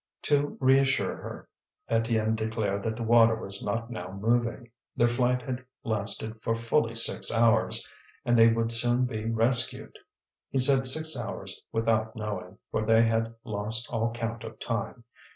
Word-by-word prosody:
To 145 Hz, 0 st, +1 dB
reassure 135 Hz, 0 st, +3 dB
her, -, -, -9 dB, 0.4 s
Étienne 115 Hz, -1 st, +1 dB
declared 110 Hz, -2 st, -2 dB
that 110 Hz, +1 st, -3 dB
the 115 Hz, -, -5 dB
water 115 Hz, 0 st, +5 dB
was 100 Hz, -2 st, -3 dB
not 115 Hz, +3 st, -3 dB
now 90 Hz, -6 st, -6 dB
moving. 115 Hz, +4 st, -1 dB, 0.2 s
Their 120 Hz, -, +3 dB
flight 125 Hz, +1 st, +1 dB
had 130 Hz, +1 st, -5 dB, 0.2 s
lasted 110 Hz, 0 st, -3 dB
for 115 Hz, -1 st, 0 dB
fully 115 Hz, +1 st, 0 dB
six 115 Hz, -, 0 dB
hours, 115 Hz, -1 st, +2 dB, 0.4 s
and 120 Hz, -, +3 dB
they 115 Hz, -1 st, +7 dB
would 115 Hz, 0 st, +1 dB
soon 120 Hz, +2 st, +2 dB
be 110 Hz, -3 st, -4 dB
rescued. 115 Hz, +2 st, +2 dB, 0.5 s
He -, -, -2 dB
said 130 Hz, 0 st, +4 dB
six 155 Hz, +3 st, +2 dB
hours 120 Hz, -3 st, -5 dB
without 110 Hz, 0 st, 0 dB
knowing, 100 Hz, -4 st, -6 dB
for -, -, -1 dB
they 115 Hz, +1 st, +4 dB
had 115 Hz, 0 st, 0 dB
lost 110 Hz, +2 st, -1 dB
all 115 Hz, 0 st, 0 dB
count 115 Hz, -1 st, -5 dB
of 110 Hz, 0 st, -9 dB
time. 115 Hz, 0 st, -4 dB
115 Hz, 155 wpm, -28 LUFS, 110-120 Hz, 0.5 s, they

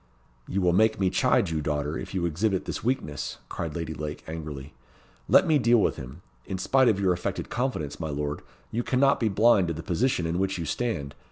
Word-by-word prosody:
"You 100 Hz, -, -1 dB
will 90 Hz, -1 st, +3 dB
make 110 Hz, +3 st, +3 dB
me 95 Hz, -2 st, +2 dB
chide -, -, +2 dB
you, 80 Hz, -1 st, -1 dB
daughter, 75 Hz, +1 st, -2 dB
if -, -, -6 dB
you 90 Hz, -2 st, 0 dB
exhibit 95 Hz, +4 st, 0 dB
this -, -, -4 dB
weakness," 110 Hz, -, -2 dB
cried 80 Hz, -3 st, -4 dB
Lady 80 Hz, -2 st, -3 dB
Lake, 75 Hz, 0 st, -6 dB
angrily. 75 Hz, -3 st, -7 dB, 0.6 s
"Let -, -, +6 dB
me 155 Hz, -4 st, +3 dB
deal 120 Hz, -1 st, +4 dB
with -, -, +1 dB
him. 65 Hz, +7 st, -9 dB, 0.2 s
In 95 Hz, -, -3 dB
spite 130 Hz, +7 st, +3 dB
of 100 Hz, -, +1 dB
your 95 Hz, -2 st, +3 dB
affected 90 Hz, -, -4 dB
confidence, 120 Hz, -, -2 dB
my 80 Hz, -2 st, -3 dB
lord, 75 Hz, 0 st, -3 dB, 0.3 s
you 115 Hz, -, -1 dB
cannot 135 Hz, +3 st, +2 dB
be 115 Hz, -, +1 dB
blind 105 Hz, -2 st, +4 dB
to 85 Hz, -, -2 dB
the 80 Hz, -, -6 dB
position 90 Hz, +1 st, 0 dB
in 85 Hz, +2 st, -1 dB
which 95 Hz, 0 st, 0 dB
you 85 Hz, -, -3 dB
stand. 75 Hz, -, -2 dB
90 Hz, 210 wpm, -27 LUFS, 75-110 Hz, 0.6 s, Let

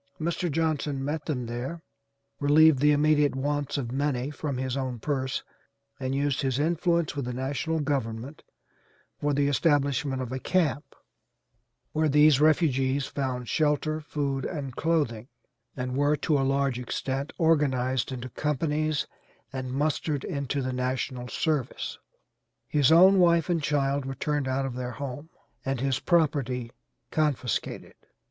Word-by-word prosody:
Mr. 170 Hz, +1 st, -1 dB
Johnson 150 Hz, -3 st, -1 dB
met 150 Hz, +1 st, -3 dB
them 125 Hz, -5 st, -2 dB
there, 125 Hz, +8 st, -5 dB, 0.6 s
relieved 150 Hz, 0 st, +5 dB
the 150 Hz, +2 st, +5 dB
immediate 150 Hz, -1 st, +3 dB
wants 145 Hz, +1 st, -1 dB
of 120 Hz, -4 st, -3 dB
many 135 Hz, 0 st, -1 dB
from 145 Hz, -2 st, -4 dB
his 130 Hz, 0 st, -2 dB
own 130 Hz, -3 st, -2 dB
purse 130 Hz, +1 st, -2 dB, 0.6 s
and 130 Hz, 0 st, -2 dB
used 140 Hz, 0 st, 0 dB
his 130 Hz, -3 st, 0 dB
influence 170 Hz, +1 st, +1 dB
with 140 Hz, -3 st, -2 dB
the 125 Hz, -, -3 dB
national 140 Hz, +5 st, -2 dB
government 135 Hz, -1 st, -3 dB, 0.8 s
for 145 Hz, -, 0 dB
the 140 Hz, 0 st, +2 dB
establishment 140 Hz, -2 st, +1 dB
of 130 Hz, -2 st, -4 dB
a 130 Hz, -, -3 dB
camp 150 Hz, -3 st, 0 dB, 1.0 s
where 155 Hz, 0 st, +1 dB
these 150 Hz, 0 st, +5 dB
refugees 140 Hz, -3 st, +3 dB
found 130 Hz, -3 st, -3 dB
shelter, 155 Hz, +1 st, +1 dB
food 140 Hz, -3 st, -2 dB
and 140 Hz, -7 st, -4 dB
clothing, 145 Hz, -9 st, 0 dB, 0.5 s
and 125 Hz, 0 st, -3 dB
were 145 Hz, +2 st, +3 dB
to 150 Hz, +1 st, 0 dB
a 140 Hz, -, +2 dB
large 135 Hz, -1 st, +1 dB
extent 135 Hz, +3 st, -3 dB
organized 135 Hz, -7 st, +2 dB
into 130 Hz, -1 st, -5 dB
companies 150 Hz, +2 st, -1 dB, 0.5 s
and 130 Hz, -1 st, -4 dB
mustered 145 Hz, +1 st, -1 dB
into 140 Hz, -1 st, -2 dB
the 130 Hz, 0 st, -2 dB
national 125 Hz, 0 st, -2 dB
service. 150 Hz, 0 st, -2 dB, 0.7 s
His 145 Hz, -1 st, +3 dB
own 185 Hz, +4 st, +7 dB
wife 170 Hz, -2 st, +4 dB
and 165 Hz, -2 st, +1 dB
child 140 Hz, -1 st, 0 dB
were 135 Hz, 0 st, -4 dB
turned 145 Hz, 0 st, -1 dB
out 135 Hz, +1 st, 0 dB
of 135 Hz, -, -4 dB
their 125 Hz, 0 st, -4 dB
home 140 Hz, +4 st, -6 dB, 0.3 s
and 135 Hz, -1 st, -2 dB
his 130 Hz, 0 st, 0 dB
property 135 Hz, -8 st, +1 dB, 0.4 s
confiscated. 150 Hz, -6 st, -1 dB
140 Hz, 140 wpm, -27 LUFS, 130-150 Hz, 1.0 s, own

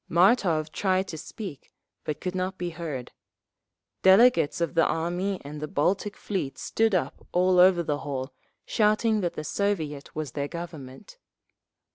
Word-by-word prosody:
Martov 170 Hz, -4 st, +3 dB
tried 190 Hz, +1 st, 0 dB
to -, -, -5 dB
speak, 185 Hz, -, -8 dB, 0.3 s
but 150 Hz, -, -3 dB
could 180 Hz, -, -3 dB
not 185 Hz, +1 st, -2 dB
be 175 Hz, -1 st, -3 dB
heard. 155 Hz, -7 st, -6 dB, 0.9 s
Delegates 190 Hz, -4 st, +5 dB
of 170 Hz, -, -1 dB
the 165 Hz, -2 st, +4 dB
Army 175 Hz, +4 st, -1 dB
and 150 Hz, +1 st, -7 dB
the 150 Hz, -, -3 dB
Baltic 195 Hz, +8 st, 0 dB
Fleet 185 Hz, -10 st, -3 dB
stood 225 Hz, -3 st, +1 dB
up 140 Hz, -6 st, -2 dB
all 180 Hz, 0 st, +3 dB
over 180 Hz, -1 st, +6 dB
the 145 Hz, -2 st, -1 dB
hall, 135 Hz, -2 st, -4 dB, 0.3 s
shouting 215 Hz, 0 st, +2 dB
that 175 Hz, -2 st, -2 dB
the 155 Hz, -, -4 dB
Soviet 155 Hz, -5 st, -2 dB
was 155 Hz, -4 st, -4 dB
their 140 Hz, +1 st, -3 dB
Government…. 165 Hz, -, -9 dB
175 Hz, 150 wpm, -26 LUFS, 150-190 Hz, 0.9 s, over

